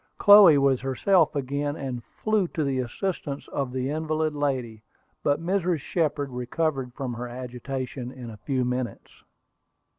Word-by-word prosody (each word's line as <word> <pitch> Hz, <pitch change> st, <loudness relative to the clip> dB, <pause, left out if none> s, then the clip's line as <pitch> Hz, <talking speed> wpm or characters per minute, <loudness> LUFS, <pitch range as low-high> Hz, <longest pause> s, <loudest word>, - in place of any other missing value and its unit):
Chloe 205 Hz, -7 st, +8 dB
was 135 Hz, -2 st, +3 dB
herself 150 Hz, +5 st, +2 dB
again, 140 Hz, +1 st, -2 dB
and 130 Hz, -5 st, -5 dB
flew 215 Hz, -, -1 dB
to 160 Hz, -, -2 dB
the 135 Hz, -2 st, 0 dB
assistance 140 Hz, -, -4 dB
of 135 Hz, -3 st, -2 dB
the 130 Hz, +1 st, -2 dB
invalid 155 Hz, 0 st, -1 dB
lady. 130 Hz, -7 st, -2 dB, 0.4 s
But 145 Hz, +1 st, +1 dB
Mrs. 180 Hz, -2 st, +1 dB
Shepard 150 Hz, -4 st, -1 dB
recovered 130 Hz, +2 st, -2 dB
from 130 Hz, -3 st, -4 dB
her 120 Hz, +1 st, -5 dB
agitation 125 Hz, +1 st, -5 dB
in 125 Hz, -3 st, -9 dB
a 110 Hz, -, -10 dB
few 130 Hz, +3 st, -1 dB
minutes. 125 Hz, -1 st, -4 dB
140 Hz, 145 wpm, -26 LUFS, 125-155 Hz, 0.4 s, Chloe